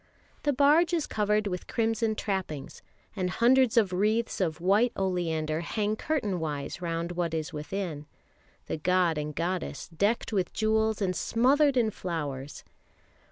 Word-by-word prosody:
The 290 - +1
barge 300 +6 +4
is 325 - 0
covered 210 0 +1
with 180 -3 -4
crimson 225 -1 0
trappings, 185 -10 -4 0.3
and 185 -3 -1
hundreds 245 +4 +3
of 200 -5 +4
wreaths 215 +4 +1
of 160 -3 -1
white 205 +7 +3
oleander 165 -5 -1
hang 210 +4 -1
curtain 215 - -1
wise 150 0 -4
round 170 0 -2
what 170 -2 -2
is 160 +2 -3
within 150 -1 -4 0.6
the - - -3
god 175 -1 +2
and 150 0 -4
goddess 180 +2 -3
decked 205 +7 0
with 190 -3 0
jewels 220 -1 +1
and 185 -1 0
smothered 275 +7 +3
in 225 -3 +3
flowers. 145 -7 -5
190 Hz, 145 wpm, -28 LUFS, 165-225 Hz, 0.6 s, barge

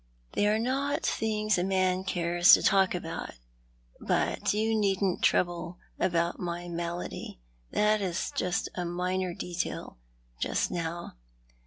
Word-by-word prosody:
" - - -37
They 205 - +2
are 210 +1 +3
not 270 +5 -1
things 215 -3 +1
a - - +1
man 185 -1 +1
cares 175 -1 +4
to - - +6
talk 190 -2 +4
about. 165 - -5 0.6
But - - 0
you 220 +2 +1
needn't 195 -3 +1
trouble 175 0 +1 0.2
about 170 -1 +1
my 175 0 -4
malady; 170 - -5 0.3
that 210 0 +2
is 185 -2 -2 0.4
a 180 - -3
minor 180 +1 -2
detail, 175 - -4 0.4
just - - 0
now. 170 - -4
180 Hz, 130 wpm, -29 LUFS, 175-205 Hz, 0.6 s, to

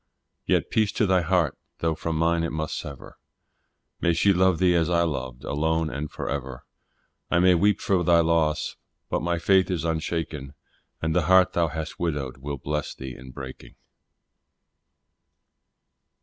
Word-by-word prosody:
Yet - - +1
peace 110 -2 +2
to 110 - +2
thy 95 -2 +3
heart, 85 -3 +1 0.2
though 80 -1 0
from 80 +1 -3
mine 85 +1 +2
it 85 - -2
must 80 -1 -3
sever, 70 -3 -8 0.8
May 85 - +2
she 100 +4 +4
love 95 -1 +3
thee 90 0 +3
as 85 -1 +2
I 85 -1 +3
loved, 65 -5 -4
alone 80 +2 0
and 75 +2 -4
for - - -6
ever; 65 -3 -5 0.6
I 90 - +2
may 90 +1 +5
weep 100 +3 +3
for 95 -3 +1
thy 85 0 +5
loss, 80 -2 +1 0.3
but - - 0
my 85 0 0
faith 95 +3 +3
is 90 -3 -1
unshaken, 80 -3 -3 0.5
And 80 -1 0
the - - +2
heart 95 0 +5
thou 85 -1 +2
hast 80 0 -6
widowed 75 -7 -2
will 70 +1 -5
bless 75 +2 -3
thee 65 -1 -7
in 65 +1 -12
breaking. 65 0 -10
80 Hz, 165 wpm, -25 LUFS, 75-85 Hz, 0.8 s, may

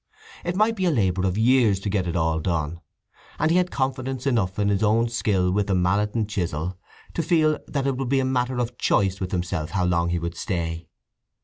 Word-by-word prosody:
It 175 +1 -2
might 215 +3 +2
be 190 -3 -1
a - - +4
labour 95 - +1
of 95 +2 -1
years 115 -4 +4
to 105 - -4
get 95 -3 0
it 85 - -2
all 80 -1 +1
done, 85 -1 -2 0.6
and 155 +2 +2
he 175 - +4
had 180 0 +2
confidence 130 -2 -2
enough 110 -9 0
in 105 -1 +1
his 100 -1 +1
own 115 +2 +3
skill 100 -6 +1
with 100 +1 0
the 95 - +1
mallet 100 +4 +1
and 110 -3 0
chisel 90 -4 -3 0.4
to - - -1
feel 155 -2 +2
that 140 -2 -2
it 135 -2 0
would 135 -2 -3
be 135 0 +3
a 130 - +1
matter 130 -1 0
of 120 0 -3
choice 95 -1 +1
with 95 -1 -4
himself 85 -3 -2
how 95 -1 0
long 85 -1 +1
he 85 - 0
would 85 0 -4
stay. 85 -4 -3
105 Hz, 225 wpm, -24 LUFS, 90-130 Hz, 0.6 s, a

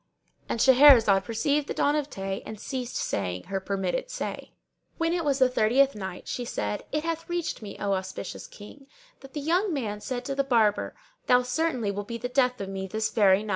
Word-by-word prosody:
"—And - - -2
Shahrazad 245 -7 +7
perceived 285 +6 0
the - - -4
dawn 290 +1 +2
of 300 -1 -1
day 195 -3 -4
and 215 - -8
ceased 255 -1 -5
saying 90 -2 -2
her 195 -1 -3
permitted 190 - -2
say. - - -5 0.4
When 330 0 +1
it 345 -1 0
was 285 -3 +1
the 260 -1 +5
Thirtieth 255 +3 +3
Night, 190 -3 -7
She 245 - -3
said, 105 - -3
It 300 +1 -1
hath 330 0 -3
reached 345 -6 -2
me, 205 -2 -8
O 200 -1 -1
auspicious 190 0 -5
King, 270 +7 -13 0.3
that 270 -1 -14
the 295 - -3
young 355 +7 +1
man 215 -9 -3
said 245 +1 -4
to 275 - -2
the 275 0 +1
Barber, 225 -6 +2 0.3
"Thou 250 0 +5
certainly 250 -4 -1
wilt 205 0 -5
be 235 - -4
the 245 - -4
death 250 -1 +2
of 195 - -4
me 190 0 -4
this 220 +3 -2
very 200 -2 +4
day!" 215 - -8
245 Hz, 210 wpm, -27 LUFS, 200-280 Hz, 0.4 s, Shahrazad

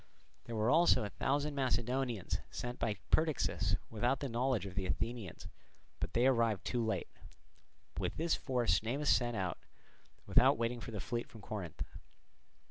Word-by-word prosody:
There 115 - -5
were 110 +3 +2
also 165 -6 +5
a 100 - -4
thousand 145 +2 0
Macedonians 125 -4 0
sent 120 0 -5
by 105 -3 0
Perdiccas 155 -5 +2 0.2
without 120 +4 +1
the 140 - -3
knowledge 120 -3 +1
of 95 - -6
the 95 -1 -2
Athenians, 115 -1 -3 0.5
but - - -3
they 120 +2 +3
arrived 115 -6 +3
too 120 -2 0
late. 110 0 -1 0.9
With - - -2
this 165 +1 +1
force 125 -3 +2
Cnemus 135 +7 0
set 120 -1 0
out, 95 -3 -2 0.7
without - - +5
waiting 115 +1 -1
for 115 - -7
the 105 -3 -5
fleet 120 +3 -3
from 110 - -12
Corinth. 95 -6 -5
120 Hz, 155 wpm, -35 LUFS, 110-130 Hz, 0.9 s, also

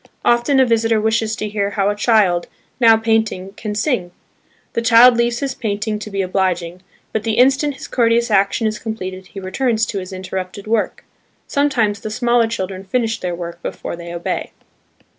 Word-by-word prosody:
Often 240 +4 +3
a 260 - +6
visitor 225 -1 +2
wishes 220 0 0
to 215 - -3
hear 205 -1 -1
how 200 0 +2
a - - -3
child, 205 -6 +2 0.3
now 225 -2 +6
painting, 220 -4 0
can 210 -1 -5
sing. 215 -5 0 0.6
The 230 - 0
child 235 +2 +7
leaves 235 +1 0
his 275 -2 -1
painting 210 -2 -2
to 215 - -7
be 195 -1 -1
obliging, 180 -2 -1 0.3
but 220 - 0
the 220 0 -1
instant 275 +3 +3
his 265 - -9
courteous 235 -1 +2
action 200 +3 +2
is 215 -1 -1
completed, 190 -4 -6
he 195 - -9
returns 225 +4 0
to 200 - -4
his 185 +1 -8
interrupted 185 +1 -6
work. 220 0 -1 0.4
Sometimes 240 -8 +1
the 215 - -5
smaller 235 +1 +2
children 190 -4 -4
finish 225 +3 -1
their 180 -1 -3
work 170 0 -7
before - - -5
they 170 0 -8
obey. 170 0 -3
215 Hz, 180 wpm, -19 LUFS, 190-235 Hz, 0.6 s, child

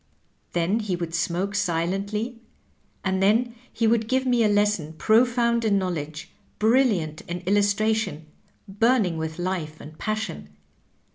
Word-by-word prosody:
'' - - -43
Then 175 +6 +1
he 205 -4 -2
would 170 -2 -5
smoke 175 +3 -1
si 200 -3 0
lently, 200 +8 -2 0.7
and 190 0 0
then 230 +5 +3 0.2
he 230 - -1
would 225 0 +2
give 260 +2 +1
me 245 -2 +3
a - - +4
lesson 205 -6 +1
profound 235 +4 +3
in 210 -3 +3
knowledge, 155 -5 -4 0.3
brilliant 215 - +2
in 175 +1 -4
illustration, 205 -3 +1 0.4
burning 205 -4 +2
with 160 0 -4
life 175 -4 -3
and 155 +2 -11
passion. 215 - -3
200 Hz, 140 wpm, -25 LUFS, 170-225 Hz, 0.7 s, a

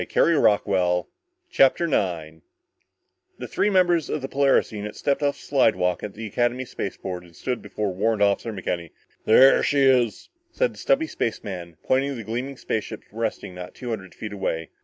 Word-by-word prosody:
CHAPTER 135 +5 +4
9 80 - -2 1.0
The - - -6
three 210 - +1
members 175 -5 +3
of 150 - -3
the - - -2
Polaris 140 -1 +2
unit 105 -1 -6
stepped 140 +1 0
off 140 -1 +1
the - - -15
slidewalk 90 -10 +2
at 105 - -7
the 110 +1 -6
Academy 120 +4 0
spaceport 95 -5 -5
and 85 -1 -18
stood 125 -2 -3
before 105 -3 -3
Warrant 105 +2 +1
Officer 100 +3 +1
McKenny. 90 -4 -4 0.4
"There 130 +5 +7
she 140 -1 +2
is," 125 -5 +2 0.2
said - - 0
the - - -14
stubby 305 +4 +2
spaceman, 95 - -4
pointing 135 +2 +1
to 140 - -4
the 115 - -6
gleaming 125 +5 -4
spaceship 110 -4 -4
resting 110 -4 -3
not 90 0 -9
two 125 - -7
hundred 95 -4 -6
feet 110 -1 -7
away. 80 -5 -3
110 Hz, 165 wpm, -24 LUFS, 95-135 Hz, 1.0 s, There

